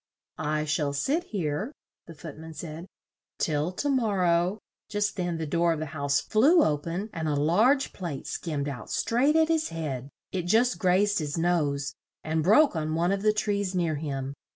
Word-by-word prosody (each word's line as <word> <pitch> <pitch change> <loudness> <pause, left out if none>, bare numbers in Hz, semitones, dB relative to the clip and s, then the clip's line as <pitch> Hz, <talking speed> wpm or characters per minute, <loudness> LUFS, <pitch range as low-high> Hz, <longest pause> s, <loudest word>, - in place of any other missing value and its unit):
"I 155 0 -1
shall 150 -1 0
sit 290 - 0
here," 190 - -2 0.4
the 165 - -10
Foot 155 0 -9
man 160 0 -9
said, 165 +2 -7 0.5
"till 155 +2 0
to 290 - -2
mor 225 -8 +1
row 175 +3 +2 0.2
" - - -66
Just 205 -1 -1
then 175 -3 -2
the 160 - -3
door 170 +2 +2
of 160 - -4
the 155 - -2
house 140 -1 +1
flew 295 +10 +4
o 150 - +2
pen 175 +8 -4
and 160 -1 -3
a 150 - +1
large 215 - +3
plate 170 -8 -5
skimmed 150 -4 -3
out 135 -5 -6
straight 270 +6 +2
at 320 0 +5
his 320 -1 +1
head; 140 -5 -4 0.2
it 180 -2 -3
just 235 +6 +3
grazed 200 +2 +3
his 150 -1 -3
nose 145 -5 0 0.3
and 160 0 0
broke 215 - +5
on 155 0 -1
one 170 +3 +1
of 195 0 0
the 215 +1 +4
trees 205 -3 -1
near 170 -3 +1
him. 140 -3 -4
170 Hz, 195 wpm, -27 LUFS, 150-205 Hz, 0.5 s, at